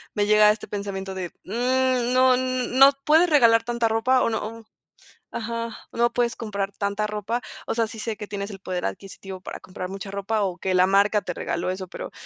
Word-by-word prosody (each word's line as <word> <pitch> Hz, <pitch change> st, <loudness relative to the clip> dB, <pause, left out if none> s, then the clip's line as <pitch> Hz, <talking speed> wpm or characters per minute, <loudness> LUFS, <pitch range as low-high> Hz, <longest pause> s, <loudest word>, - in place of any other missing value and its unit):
me 205 Hz, -, +2 dB
llega 210 Hz, 0 st, +6 dB
este 210 Hz, -, -5 dB
pensamiento 195 Hz, -2 st, -5 dB
de, 180 Hz, -2 st, -4 dB, 0.2 s
mm 250 Hz, +2 st, +1 dB
no 255 Hz, 0 st, +5 dB
no 255 Hz, +1 st, +4 dB
puedes 320 Hz, +3 st, +5 dB
regalar 230 Hz, -6 st, +5 dB
tanta 235 Hz, -1 st, 0 dB
ropa, 240 Hz, +4 st, +2 dB
o -, -, +2 dB
no 225 Hz, +1 st, -4 dB, 0.7 s
ajá, 230 Hz, 0 st, -4 dB, 0.2 s
no 235 Hz, 0 st, +1 dB
puedes 235 Hz, -1 st, 0 dB
comprar 200 Hz, -4 st, -3 dB
tanta 200 Hz, +1 st, -2 dB
ropa. 210 Hz, +3 st, -3 dB, 0.3 s
O -, -, 0 dB
sea, 230 Hz, -1 st, +2 dB
sí 220 Hz, 0 st, -10 dB
sé 225 Hz, 0 st, -3 dB
que 210 Hz, -, -7 dB
tienes 200 Hz, 0 st, -5 dB
el 195 Hz, -, -9 dB
poder 185 Hz, -2 st, -4 dB
adquisitivo 190 Hz, -, -7 dB
para -, -, -7 dB
comprar 185 Hz, 0 st, -7 dB
mucha 195 Hz, 0 st, -7 dB
ropa, 200 Hz, +2 st, -1 dB
o 185 Hz, -2 st, -2 dB
que 185 Hz, +1 st, -2 dB
la 180 Hz, 0 st, +5 dB
marca 205 Hz, +2 st, +3 dB
te 180 Hz, -, -4 dB
regaló 170 Hz, +1 st, -3 dB
eso, 185 Hz, 0 st, -5 dB
pero -, -, -8 dB
215 Hz, 200 wpm, -24 LUFS, 195-235 Hz, 0.7 s, llega